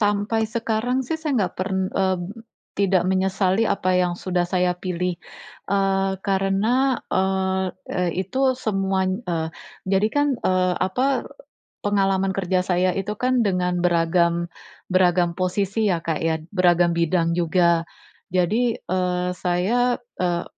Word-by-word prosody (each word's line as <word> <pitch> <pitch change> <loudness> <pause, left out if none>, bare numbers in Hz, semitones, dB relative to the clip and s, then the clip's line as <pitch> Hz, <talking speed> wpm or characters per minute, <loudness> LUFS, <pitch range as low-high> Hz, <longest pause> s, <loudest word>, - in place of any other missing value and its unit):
sampai 210 +1 +1
sekarang 235 +3 -1
sih, 320 +6 -2
saya 310 -2 -2
nggak - - -5
pern 190 +1 -1
eee, 190 -1 +1 0.6
tidak 190 -3 +2
menyesali 190 +2 +1
apa 185 -2 +1
yang 180 -1 +2
sudah 180 -1 0
saya 180 -1 +1
pilih. 180 0 -2 0.6
Eee, 195 -1 +1
karena, 205 +7 +1
eee, 190 0 +1 0.3
eee, 180 -1 0
itu 260 +5 +1
semuany 195 -3 -1
eee, 160 -2 -1 0.4
jadi 195 +2 +3
kan, 290 0 +3
eee, 185 -1 +1
apa, 255 +8 0 0.6
pengalaman 195 -1 +1
kerja 185 -1 0
saya 180 0 +2
itu 195 +2 -2
kan 250 +2 +1
dengan 180 -2 0
beragam 170 0 +1 0.4
beragam 180 -2 +2
posisi, 195 +4 0
ya 170 -3 0
Kak, 160 -2 -2
ya. 160 -1 0
Beragam 175 -3 +3
bidang 170 0 +1
juga. 170 -1 +2 0.5
Jadi, 220 +7 +2
eee, 180 0 -1
saya, 215 +8 +1 0.3
eee, 175 -1 0
185 Hz, 130 wpm, -23 LUFS, 180-205 Hz, 0.6 s, jadi